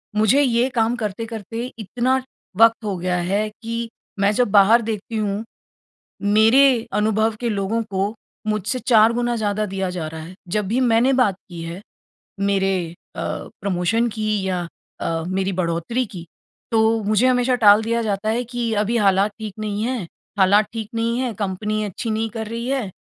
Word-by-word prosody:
मुझे 220 +7 +4
ये 245 -1 +2
काम 230 +1 +2
करते-करते 225 0 -5 0.2
इतना 255 +5 0 0.4
वक़्त 230 0 +5
हो 200 -2 -1
गया 180 0 -1
है 200 +5 0
कि 230 0 -4 0.3
मैं 200 +1 +3
जब 250 +3 +2
बाहर 215 +4 +6
देखती 220 0 -4
हूँ, 210 0 -1 0.8
मेरे 225 +4 +4
अनुभव 215 +1 +1
के 240 -1 -1
लोगों 205 +2 -1
को 195 +2 -1 0.3
मुझसे 215 +4 -1
4 225 -1 +6
गुना 240 0 0
ज़्यादा 215 -1 -1
दिया 190 -1 -3
जा 175 -3 -4
रहा 160 0 -7
है। 180 +3 -10
जब 205 +2 -1
भी 235 +5 0
मैंने 245 +2 +3
बात 245 -7 +3
की 170 -1 -8
है 170 +4 -6 0.6
मेरे 195 -1 +1 0.4
अ, - - -4 0.4
प्रमोशन 200 +5 +1
की 215 -2 -1
या 180 -2 -2 0.3
अ, 165 -1 -1
मेरी 190 +1 -1
बढ़ोतरी 175 +8 -1
की, 180 -5 -9 0.4
तो 220 0 +3
मुझे 215 +4 +3
हमेशा 250 0 +3
टाल 205 +2 +8
दिया 230 0 0
जाता 210 0 -2
है 240 +2 0
कि 240 -1 -3
अभी 230 +3 0
हालात 200 -1 +3
ठीक 215 -3 -6
नहीं 210 0 -3
है 240 -8 -2 0.3
हालात 200 +3 +5
ठीक 220 -2 -5
नहीं 230 +1 0
है, 255 -3 -1
कंपनी 210 +2 -2
अच्छी 210 +3 -4
नहीं 220 +1 -1
कर 220 0 -5
रही 230 +3 -4
है 260 -8 -1
215 Hz, 170 wpm, -21 LUFS, 195-230 Hz, 0.8 s, टाल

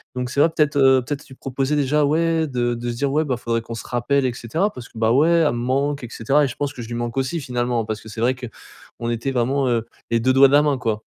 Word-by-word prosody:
Donc 125 -1 -3
c'est 140 - -2
vrai 160 +3 +5
peut-être, 150 -1 +2
heu, 135 -1 +5
peut-être 145 +3 -5
lui 130 - -13
proposer 135 +3 -2
déjà 145 +1 +2
ouais 165 +2 +1
de 120 -2 -1
de 120 +1 -4
se 120 - -6
dire 140 +2 -1
ouais, 155 +2 +1
bah, 130 -4 -1
faudrait 115 -1 -2
qu'on 115 0 -8
se 115 - -8
rappelle 130 +3 0
et 125 - -2
cetera 160 - -1
parce 125 -2 -10
que, - - -16
bah, 110 0 +3
ouais 150 +7 +4
elle 165 -3 +3
me 120 - -3
manque 135 +3 -1
et 120 - -6
cetera 140 +6 +2
et - - 0
je 125 - -7
pense 145 0 -3
que 125 - -8
je - - -9
lui 120 - -5
manque 120 +1 -4
aussi 135 +6 -1
finalement. 120 -3 -1
Parce 110 -1 -4
que 110 - -14
c'est 110 +1 -6
vrai 125 +2 +2
qu'on 120 -1 -9
était 120 +4 -2
vraiment, 130 +2 0
heu, 115 -2 0 0.3
les 115 - +3
2 130 +3 +2
doigts 135 +1 +7
de 135 - -1
la 145 - +7
main 145 -2 +1
quoi. 110 -4 -2
130 Hz, 295 wpm, -21 LUFS, 120-145 Hz, 0.3 s, doigts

